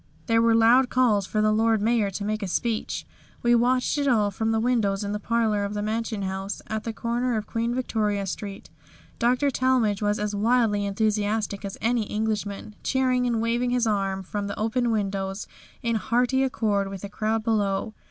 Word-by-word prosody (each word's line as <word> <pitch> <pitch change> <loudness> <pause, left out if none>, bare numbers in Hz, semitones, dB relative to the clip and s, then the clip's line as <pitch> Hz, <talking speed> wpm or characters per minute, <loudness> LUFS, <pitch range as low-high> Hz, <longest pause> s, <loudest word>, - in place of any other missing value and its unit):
There 230 -1 +3
were 230 0 +4
loud 240 +3 +5
calls 220 -6 +2
for 215 - 0
the 215 - +3
Lord 220 +1 +3
Mayor 220 -1 +2
to 195 +1 -5
make 215 +1 -2
a 200 - -2
speech. 220 +4 -2 0.4
We 240 0 +4
watched 250 +4 +2
it 285 - 0
all 215 -5 +3
from 220 +3 -1
the 225 - +1
windows 220 -4 +1
in 200 - -3
the 210 - -2
parlour 220 -2 +1
of 200 +1 -3
the 205 - -2
Mansion 220 -1 -2
House, 190 +1 -4
at 220 0 -4
the 230 - -2
corner 235 +1 -1
of 215 - -3
Queen 230 +2 -2
Victoria 210 -5 -1
Street. 195 +1 -6 0.5
Dr. 255 +4 +2
Talmage 250 -6 +1
was 205 0 +1
as 210 0 -2
wildly 210 -1 +2
enthusiastic 210 0 -1
as 200 -1 -5
any 230 -1 +1
Englishman, 210 -1 -3
cheering 255 -1 +1
and 230 -2 0
waving 240 +2 0
his 245 -1 +1
arm 195 -3 0
from 200 +2 -4
the 200 - -5
open 235 +3 0
windows 195 -2 -2 0.4
in 230 -1 +1
hearty 245 +4 +1
accord 210 -6 0
with 195 -1 -7
the 200 - -5
crowd 220 +1 -1
below. 215 -1 0
220 Hz, 190 wpm, -25 LUFS, 205-235 Hz, 0.5 s, loud